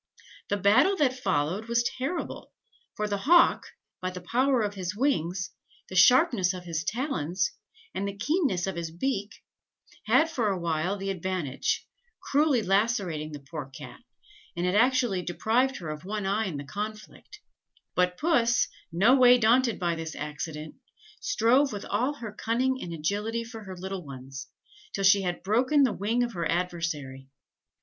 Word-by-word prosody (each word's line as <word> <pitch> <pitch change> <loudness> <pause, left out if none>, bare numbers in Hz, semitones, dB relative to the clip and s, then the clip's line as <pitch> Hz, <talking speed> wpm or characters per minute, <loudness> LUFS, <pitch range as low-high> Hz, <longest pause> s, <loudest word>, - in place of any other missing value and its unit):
The 205 - +1
battle 205 - +4
that 275 -6 +3
followed 175 +1 0
was 235 0 +2
terrible, 275 +8 -4 0.4
for 210 - -1
the 200 -1 -2
hawk, 340 - +4 0.3
by 185 - -1
the 180 0 -7
power 250 +6 +1
of 205 -1 -2
his 185 -1 -4
wings, 185 - 0 0.4
the 185 - -7
sharpness 205 - +5
of 180 - -8
his 165 -2 -3
talons, 190 - -1 0.4
and 200 - -2
the 200 0 -6
keenness 270 - 0
of 190 -2 -3
his 170 -1 -3
beak, 205 +4 -3 0.6
had 320 - +5
for 250 -9 -1
awhile 170 0 -1
the 195 0 -3
advantage, 180 -7 -2 0.3
cruelly 285 -5 +2
lacerating 195 -7 0
the 145 -2 -8
poor 150 -5 -5
Cat, 135 - -11 0.6
and 175 - 0
had 180 - +1
actually 245 -3 +3
deprived 230 +9 0
her 165 -4 -6
of 150 0 -7
one 205 +1 -3
eye 205 +3 +1
in 165 -6 -4
the 140 - -5
conflict; 215 - -7 0.5
but 180 0 +1
Puss, 245 -7 +2 0.2
no 205 +10 +5
way 250 -2 +7
daunted 240 +1 +3
by 175 -2 0
this 165 -1 -5
accident, 150 +1 -6 0.5
strove 270 - +3
with 205 -1 -6
all 250 +8 0
her 230 -6 -7
cunning 255 +5 0
and 170 - -6
agility 205 +8 -2
for 225 -2 -10
her 190 -1 -8
little 190 0 -5
ones, 135 -1 -9 0.5
till 195 - -2
she 195 +1 +6
had 180 -2 -3
broken 255 +8 +3
the 250 -5 +2
wing 220 +6 0
of 240 -1 -3
her 170 -3 -2
adversary. 165 -7 -3
200 Hz, 160 wpm, -27 LUFS, 175-245 Hz, 0.6 s, way